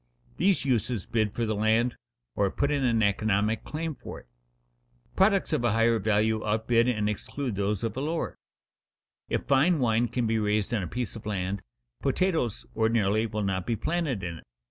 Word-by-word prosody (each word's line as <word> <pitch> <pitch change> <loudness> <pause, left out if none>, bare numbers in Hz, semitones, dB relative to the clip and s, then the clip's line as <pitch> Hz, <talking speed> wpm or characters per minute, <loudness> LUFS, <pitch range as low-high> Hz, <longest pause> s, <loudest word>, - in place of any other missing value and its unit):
These 195 -6 +2
uses 120 -5 0
bid 110 -3 0
for 115 - -2
the 110 - 0
land, 110 +3 +2 0.4
or 100 -1 +2
put 140 +8 0
in 140 -2 +1
an 115 -3 +2
economic 105 +1 +1
claim 160 +1 -4
for - - -9
it. - - -19 0.9
Products 195 -3 +3
of 150 - +1
a 120 -3 +2
higher 115 0 +3
value 110 +1 +1
outbid 115 +2 +2
and 105 -4 +1
exclude 120 +4 -3
those 100 +1 -1
of 115 -2 -2
a 130 - -2
lower. 160 +3 -2 0.9
If - - -1
fine 145 +6 +3
wine 120 -2 +2
can 120 0 -1
be 110 0 +1
raised 105 +1 0
on 110 - +1
a 90 - -3
piece 120 +2 -4
of 110 -1 -8
land, 100 -1 -2 0.4
potatoes 150 - 0
ordinarily 110 -1 +2
will 105 -1 -3
not 95 -2 -1
be 115 - +1
planted 150 - -1
in 85 -2 -4
it. - - -16
115 Hz, 185 wpm, -27 LUFS, 105-125 Hz, 0.9 s, Products